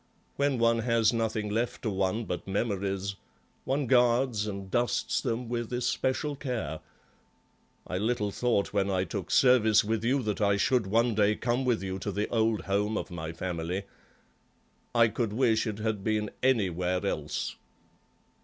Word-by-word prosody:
When 140 -2 +1
one 115 0 +3
has 115 -1 +2
nothing 110 -2 -1
left 120 +3 -2
to 110 - 0
one 95 +4 0
but 90 - -5
memories, 100 -1 -2 0.5
one 140 +1 0
guards 120 -3 +3
and 100 -2 -6
dusts 120 0 0
them 120 -1 -2
with 120 0 -3
especial 130 +4 -1
care. 115 - -4 1.1
I 90 - -3
little 110 -1 0
thought 115 -3 0
when 100 -1 +1
I 95 -1 +1
took 90 - -5
service 120 -5 +5
with 110 +1 -1
you 130 +3 +1
that 105 -1 -2
I 100 -1 +3
should 120 0 +2
one 115 +3 +2
day 105 0 +3
come 120 +3 -1
with 120 -5 +1
you 95 0 -3
to - - -3
the 105 +1 -1
old 110 -2 +1
home 105 +2 0
of - - -5
my 80 -2 -5
family. 90 +2 -3 1.1
I 115 -1 +6
could 110 -1 -2
wish 115 -2 +2
it 105 -2 -3
had 110 -2 -2
been 105 -1 0
anywhere 90 -7 +1
else." 75 -6 -2
110 Hz, 160 wpm, -29 LUFS, 100-120 Hz, 1.1 s, I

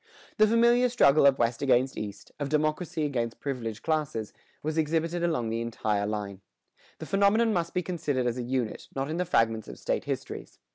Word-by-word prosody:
The 215 -1 +6
familiar 235 +2 +4
struggle 145 - +5
of 135 -1 +4
West 115 0 0
against 130 -1 +2
East, 105 -2 -7
of 145 -1 -2
democracy 155 +2 0
against 120 -5 -2
privileged 115 -6 -4
classes, 150 -9 -1 0.3
was 155 +1 -2
exhibited 165 +2 0
along 155 -10 0
the 115 +1 -2
entire 105 -3 -1
line. 100 -2 -4 0.6
The - - -7
phenomenon 210 +3 +3
must 170 -2 -2
be 180 - +1
considered 145 -8 -1
as 120 +1 -1
a - - -1
unit, 120 -2 -3
not 135 +2 -2
in 165 - -2
the 180 - 0
fragments 115 -9 +1
of - - -9
state - - -2
histories. - - -5
140 Hz, 185 wpm, -28 LUFS, 115-170 Hz, 0.6 s, The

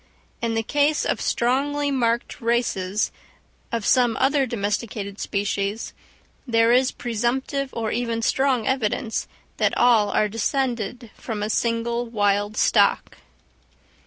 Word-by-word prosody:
In 230 -1 -1
the 225 - 0
case 290 +5 +1
of - - -1
strongly 285 +4 0
marked 235 -3 -1
races 220 -4 0 0.6
of 230 -3 -2
some 245 -3 +3
other 270 0 +2
domesticated 205 -2 -3
species, 200 +1 -2 0.5
there 230 -1 +3
is 255 +2 +4
presumptive 255 +4 -2
or 225 -2 -3
even 230 -1 -2
strong 265 -2 +1
evidence 235 -2 -1 0.3
that - - +1
all 230 -4 +4
are 210 - +2
descended 235 0 -2
from 215 -3 -5
a 215 - -1
single 235 +1 0
wild 205 -1 0
stock. - - +2
230 Hz, 120 wpm, -23 LUFS, 215-255 Hz, 0.6 s, is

